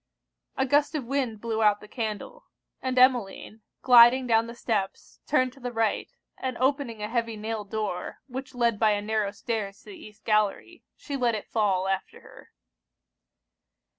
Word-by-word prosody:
A 265 - +2
gust 290 +3 +2
of 285 -5 -2
wind 250 -5 -2
blew 225 -1 -2
out 210 -1 +4
the 210 - -13
candle; 225 - -5 0.4
and 260 -1 -2
Emmeline, 240 -4 +2 0.2
gliding 245 +1 +7
down 230 -1 +2
the 235 - -8
steps, 205 -5 -3
turned 255 -3 +2
to 275 - -17
the 245 -1 -5
right, 225 -2 -1 0.3
and 255 -2 -3
opening 260 -5 -1
a - - -1
heavy 230 -1 -2
nailed 215 -1 -5
door, 215 -4 -3
which 265 0 -7
led 235 -3 +1
by 215 -2 +4
a 205 - -1
narrow 215 -1 0
stairs 200 -1 -4
to - - -12
the - - -10
East 215 -8 -14
gallery, 215 - 0
she 285 - -6
let 245 -4 +1
it 210 - -7
fall 195 -4 +1
after 195 0 -3
her. - - -16
230 Hz, 170 wpm, -27 LUFS, 210-255 Hz, 0.4 s, gliding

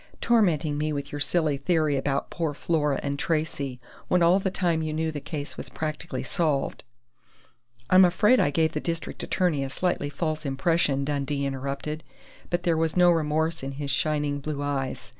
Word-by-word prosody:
"Tormenting 165 -10 +2
me 155 +1 0
with 140 -1 -4
your 145 - -5
silly 155 -2 +1
theory 155 0 +1
about 135 0 -1
poor 160 -4 -2
Flora 150 -3 0
and 140 0 -2
Tracey, 150 -6 -1 0.3
when 180 -1 +3
all 175 +3 +5
the 190 - 0
time 175 -3 0
you 155 -1 -2
knew 160 +1 -1
the 150 - -4
case 145 -1 -6
was - - -6
practically 155 +2 -4
solved 155 -6 -1 0.5
" 120 0 -34
"I'm 185 +1 +8
afraid 210 +8 +4
I - - +3
gave 160 +2 +2
the - - -2
district 165 -1 -4
attorney 170 -7 0
a 135 - -3
slightly 145 -1 -1
false 155 +1 -2
impression," 140 0 +1
Dundee 140 -1 -1
interrupted, 140 +3 -4 0.5
but 175 0 -1
there 170 -3 +2
was 160 +1 0
no 175 -1 +7
remorse 160 0 0
in 135 +1 -5
his 140 0 -3
shining 145 0 0
blue 145 0 -4
eyes. 135 -2 -3
155 Hz, 180 wpm, -26 LUFS, 140-165 Hz, 0.5 s, I'm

